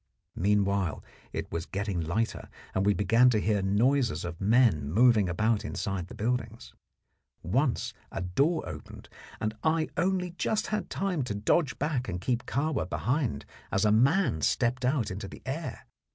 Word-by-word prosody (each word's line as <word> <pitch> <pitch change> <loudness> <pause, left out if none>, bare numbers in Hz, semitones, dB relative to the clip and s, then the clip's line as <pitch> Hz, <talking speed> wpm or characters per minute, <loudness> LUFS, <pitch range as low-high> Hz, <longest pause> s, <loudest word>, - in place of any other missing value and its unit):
Meanwhile 100 -3 +1 0.3
it - - -5
was 85 0 -3
getting 100 -3 -2
lighter, 100 +8 -2 0.2
and 95 +1 +1
we 105 - +4
began 115 +5 +4
to 110 -3 +2
hear 105 -1 +1
noises 110 - +2
of 85 -1 -6
men 100 - +3
moving 110 -1 +4
about 110 +4 +1
inside 95 -3 -3
the - - -10
buildings. 115 0 -3 0.7
Once 125 - 0 0.2
a - - -4
door 140 - +1
opened, - - -9 0.3
and 110 0 -2
I 160 0 +1
only 180 -1 +1
just 210 +4 -1
had 210 -1 -2
time 190 -6 -1
to 105 - -3
dodge 130 +8 +1
back 135 -5 -1
and 90 -2 -3
keep 120 +5 -2
Kahwa 140 - -1
behind 125 - -1 0.3
as 100 +2 +2
a 105 - +4
man 130 - +3
stepped 125 - +1
out 125 -5 +1
into 100 +1 -5
the - - -12
air. 150 +5 -5
115 Hz, 160 wpm, -29 LUFS, 100-135 Hz, 0.7 s, we